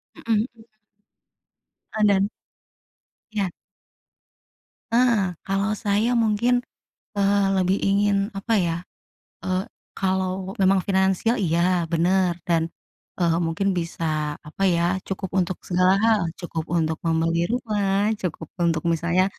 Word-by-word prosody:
Mhm 230 - -2
mhm. 225 +1 -4 1.2
Eee, 215 - +3
dan 200 0 +3 1.0
Iya. 200 -4 -1 1.4
Ah, 230 -6 +3
kalau 195 +2 0
saya 210 +3 +2
mungkin, 225 +3 +2 0.6
eee, 200 0 +3
lebih 185 +1 +2
ingin 200 +1 +3 0.2
apa 225 +4 -3
ya, 170 -4 +1 0.7
eee, 185 0 0 0.3
kalau 190 0 -1
memang 190 0 +4
finansial, 190 +4 +2
iya, 170 -2 +1 0.3
bener, 175 +2 +2
dan, 165 -1 +1 0.5
eee, 170 -2 +2
mungkin 165 +4 -1
bisa 155 -3 -2
apa 155 +6 -4
ya, 170 -1 +2 0.2
cukup 190 0 -4
untuk 180 0 -1
segala 185 +1 +3
hal, 225 -2 +4 0.2
cukup 170 -3 -4
untuk 160 -1 0
membeli 165 +1 +1
rumah, 210 -4 0
cukup 160 -3 -4
untuk 165 -2 +1
misalnya, 170 +3 +2
190 Hz, 115 wpm, -24 LUFS, 170-205 Hz, 1.4 s, memang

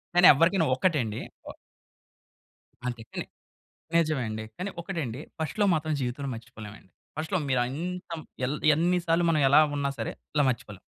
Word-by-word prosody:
కానీ 175 0 +8
ఎవరికైనా 165 +4 +3
ఒక్కటండి. 130 - 0 1.7
అంతే 120 -2 -4
కానీ - - -3 0.7
నిజమే 155 -5 +2
అండి. 110 0 -4
కానీ 190 +2 -3
ఒకటండి 160 - -4 0.2
ఫస్ట్ 160 +6 -4
లవ్ 200 -2 +5
మాత్రం 155 0 -1
జీవితంలో 130 +2 -3
మర్చిపోలేమండి. 110 -4 -11 0.3
ఫస్ట్ 160 +5 -4
లవ్ 165 -5 +1
మీరు 130 -1 +3
ఎంకం 175 +1 -5 0.5
ఎన్ని 175 +3 +2
సార్లు 165 +1 +3
మనం 155 -2 +2
ఎలా 145 - +8 0.2
ఉన్నా 140 -1 0
సరే, - - -3 0.2
ఇలా 145 - +4
మర్చిపోలేం. 105 -5 -6
155 Hz, 145 wpm, -27 LUFS, 125-170 Hz, 1.7 s, కానీ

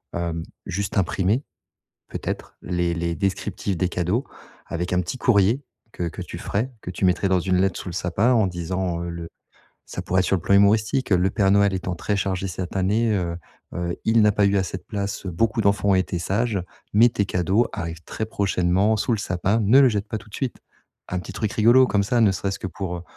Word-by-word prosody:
Heu, 85 -1 -2 0.2
juste 100 +3 -3
imprimer, 95 - +1 0.7
peut-être - - -5
les 85 -1 -1
les 85 0 -2
descriptifs 95 +1 -2
des 90 +1 0
cadeaux 90 - -1 0.4
avec 90 +2 -3
un 90 - +3
petit 90 +8 -5
courrier 115 +1 +3 0.3
que 85 -1 -3
que - - -8
tu - - -7
ferais, 115 +7 -2
que 90 - -6
tu 95 - -1
mettrais 95 +2 +2
dans 95 -1 +3
une 90 +1 +1
lettre 95 -1 0
sous - - -8
le - - -7
sapin 95 +8 +1
en 110 -5 +3
disant, 90 0 -3
heu, 85 - -4
le 85 -1 -6 0.6
ça - - -5
pourrait 95 +1 +1
être 90 - 0
sur 95 - +2
le - - -4
plan 100 - +3
humoristique: 110 +6 +3
«Le 90 -1 +4
père 95 -1 +2
Noël 100 0 +4
étant 90 -1 -3
très 100 +4 -2
chargé 95 -1 -1
cette 90 0 -5
année, 105 +4 +2
heu 85 -3 -1 0.4
heu, 85 0 -2
il 110 0 +4
n'a 105 0 +5
pas 100 0 +3
eu 100 0 +2
assez 95 -1 -1
de - - -23
place, 100 -2 -4
beaucoup 110 +6 0
d'enfants 100 0 +2
ont - - +5
été 95 -1 0
sages, 100 +2 0 0.3
mais 115 +4 +7
tes 100 -3 0
cadeaux 95 +6 +1
arrivent 85 0 -5
très 110 - -4
prochainement 100 0 +1
sous 110 - 0
le 110 - +1
sapin, 100 +2 0
ne 110 +6 +6
le 135 - +7
jette 105 -1 -2
pas - - -3
tout 110 - -16
de - - -16
suite». 130 -3 -3 0.5
Un 90 - -2
petit - - -9
truc 110 -1 -2
rigolo 120 +4 +5
comme 100 -4 +1
ça, 120 +4 +1
ne 105 -3 +5
serait-ce 100 +1 -3
que - - -5
pour, 90 0 -4
heu 85 - -7
95 Hz, 225 wpm, -23 LUFS, 90-105 Hz, 0.7 s, mais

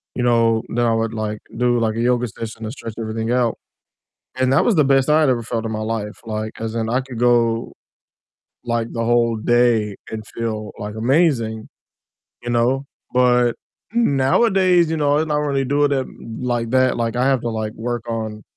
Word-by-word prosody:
you 125 - -1
know, 115 -2 +3
then 120 0 +1
I 115 - +2
would, 115 0 -1
like, 110 -1 -3 0.2
do, 120 0 +2
like, 110 -1 0
a - - -3
yoga 125 0 +1
session 115 0 -8
to 110 - -4
stretch 115 -3 -7
everything 110 +1 -3
out, 120 -2 +1 0.8
and 130 0 +1
that - - +4
was 235 - +2
the 155 - +5
best 135 +1 +3
I 155 +1 +5
had 150 - +3
ever 120 -2 +1
felt 115 0 -3
in 110 - -3
my 110 - -3
life, 110 -1 -4
like, 110 0 -4
'cause 115 0 -5
then 115 -1 -2
I 125 +3 +1
could 130 -3 -9
go, 120 -2 +2 0.9
like, 115 -1 -2
the 115 -1 -2
whole 115 -1 +2
day 115 -3 +2 0.2
and 110 -1 -5
feel, 110 -2 -3
like, 105 +1 -6
amazing, 115 -3 +1 0.8
you 120 - -4
know? 125 +3 +1 0.3
But, 125 -1 +4 0.4
mm 235 -11 +2
nowadays, 180 - +3
you 160 - 0
know, 145 -1 +2
I'm 160 - 0
not 150 -1 +1
really 140 -2 0
doing 145 +2 +2
it 135 -1 0 0.3
like 120 -2 -1
that, 130 0 +3
like, 115 0 -1
I 125 +2 +2
have 135 -3 +2
to, 120 - -3
like, 110 -1 -3
work 120 0 -4
on 110 -2 -4
120 Hz, 200 wpm, -20 LUFS, 115-130 Hz, 0.9 s, the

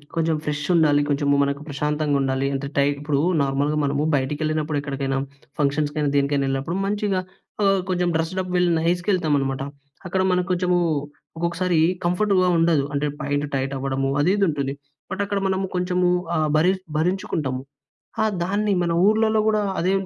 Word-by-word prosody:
కొంచెం 165 -1 +1
ఫ్రెషుండాలి, 150 0 +2
కొంచెం 145 0 0 0.2
మనకు 140 0 -2
ప్రశాంతంగా 150 0 0
ఉండాలి. 135 0 0
అంటే 135 0 -3
టై 140 - +4 0.6
నార్మల్‍గా 140 +2 0
మనము 140 +1 0
బయటికెళ్ళినప్పుడు 150 +2 -1
ఎక్కడికైనా, 135 -1 -2 0.4
ఫంక్షన్స్‌కైనా, 145 +1 0
దేనికైనా 140 0 +2
వెళ్ళినప్పుడు 135 +5 -2
మంచిగా 205 -2 0 0.4
ఆహ్, 195 -1 +4
కొంచెం 180 -1 +1
డ్రెస్డ్అప్ 180 +3 -2
వెల్ 180 0 +3
నైస్‌గా 175 +4 0
వెళ్తామనమాట. 145 -7 0 0.5
అక్కడ 185 +1 0
మనకు 180 -1 +1
కొంచెము 180 0 +2 0.6
ఒక్కొక్కసారి 170 0 0 0.3
కంఫర్ట్‌గా 185 +1 +2
ఉండదు. 165 -3 +3
అంటే 140 +1 0 0.2
ప్యాంట్ 145 +1 -1
టైట్ 135 0 -1
అవ్వడము 135 0 -1
అది, 170 +5 +3
ఇది 200 - +3
ఉంటుంది. 140 -3 -2 0.4
బట్ 195 - -2
అక్కడ 200 0 -1
మనము 190 0 0
కొంచెము 180 0 +1 0.3
ఆహ్, 155 -1 +1
భరి 170 +4 +4 0.3
భరించుకుంటాము 155 -6 -1 0.6
ఆహ్, 220 -1 +1
దాన్ని 205 +3 0
మన 170 -1 0
ఊర్లలో 220 +1 +3
కూడా 215 -1 +2 0.2
అదే 180 +3 +1
155 Hz, 145 wpm, -23 LUFS, 140-180 Hz, 0.6 s, టై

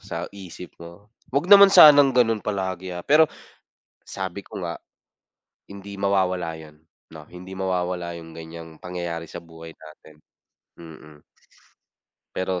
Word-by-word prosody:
sa 85 +1 -6
isip 90 -2 -11
mo, 85 +6 -14 0.2
wag 140 +4 -1
naman 200 0 +10
sanang 145 -8 +7
gano'n 115 -3 +3
palagi, 95 -3 -4
ah, 90 - -8
pero, 155 +2 +5 0.8
sabi 95 0 -6
ko - - -8
nga, 85 -1 -5 0.9
hindi 100 0 -10
mawawala 95 -4 0
'yon 75 -1 -14 0.3
no, 75 -1 -12
hindi 90 +2 -11
mawawala 90 -2 -3
yung 80 -1 -12
ganyang 80 0 -11
pangyayari 85 -2 -6
sa - - -8
buhay 80 0 -12
natin. 75 0 -16 0.6
Mm. 75 -3 -14 1.1
Pero 95 -1 -2
90 Hz, 130 wpm, -23 LUFS, 85-100 Hz, 1.1 s, naman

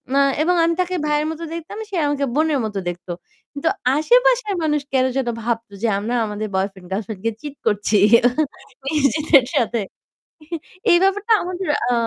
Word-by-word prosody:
আ - - +5 0.2
এবং 360 +3 +2
আমি 335 0 +2
তাকে 365 0 -2
ভাইয়ের 300 +1 +1
মত 320 - -7
দেখতাম, 335 +5 -7
সে 395 - -5
আমাকে 285 -1 0
বোনের 310 -2 +2
মত 210 -1 -5
দেখত। 175 +1 -8 0.5
কিন্তু 290 +3 0 0.3
আশেপাশের - - +3
মানুষ 300 -2 +1
কেন 260 -1 +3
যেন 265 -2 -1 0.2
ভাবতো 230 -2 -3
যে - - +3
আমরা 230 +4 -2
আমাদের 210 0 -4
বয়ফ্রেন্ড 190 -1 -3
গার্লফ্রেন্ড 200 0 -4
কে 230 - +2
চিট 290 -1 -7
করছি। 210 +1 +2 1.0
ইজিতের 285 -1 +4
সাথে। 235 -1 +1 1.1
এই 345 - +7
ব্যাপারটা 410 +3 +2
আমাদের 365 +1 -4 0.2
আ - - +2
290 Hz, 160 wpm, -21 LUFS, 220-335 Hz, 1.1 s, এই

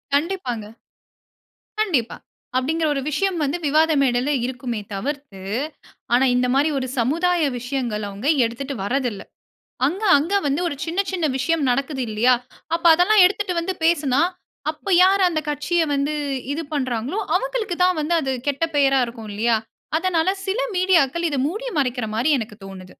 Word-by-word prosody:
கண்டிப்பாங்க, 285 - -2 1.2
கண்டிப்பா. 295 - 0 0.4
அப்டிங்கற 315 +5 0
ஒரு 275 - -1
விஷயம் 365 +4 0
வந்து 285 +5 -1
விவாத 315 +2 +3
மேடையில 260 +2 +1
இருக்குமே 245 -3 -4
தவிர்த்து, 270 -2 -5 0.7
ஆனா 255 +2 +4
இந்த 250 0 +2
மாரி 285 +3 +3
ஒரு 260 -1 -3
சமுதாய 335 +8 +1 0.2
விஷயங்களை 240 -4 -3
அவங்க 205 +9 -4 0.2
எடுத்துட்டு 270 +4 -4
வரதில்ல. 245 -3 -1 0.7
அங்க 380 +8 -3
அங்க 330 +8 -2
வந்து 285 +5 0
ஒரு 285 - -3
சின்ன 340 +4 -2
சின்ன 350 -4 -1
விஷயம் 320 +3 0
நடக்குது 275 +1 -1
இல்லியா, 235 +4 +3 0.4
அப்ப 335 - -5
அதெல்லாம் 365 +3 +5
எடுத்துட்டு 405 -1 0
வந்து 375 +3 -2
பேசுனா, 290 -4 +2 0.5
அப்போ 355 +5 -9
யார் 390 +1 +4
அந்த 320 - -1
கட்சியை 320 +3 0
வந்து 280 +2 0 0.4
இது 320 - -3
பண்றாங்களோ, 255 - -2 0.2
அவங்களுக்கு 485 -4 -1
தான் 365 -2 +3
வந்து 325 +3 -1
அது 265 -1 -2 0.2
கெட்ட 285 +3 +1
பெயரா 270 -2 +4
இருக்கும் 230 -2 -9
இல்லியா. 230 +2 +2 0.4
அதனால, 350 0 +1 0.2
சில 405 +6 0 0.2
மீடியாக்கள் 340 -3 +2
இதை 285 - -2
மூடி 430 +9 -4
மறைக்கிற 245 -4 -1
மாரி 260 +7 +2
எனக்கு 215 -2 -7
தோணுது. 185 -1 -10
285 Hz, 150 wpm, -22 LUFS, 250-345 Hz, 1.2 s, அதெல்லாம்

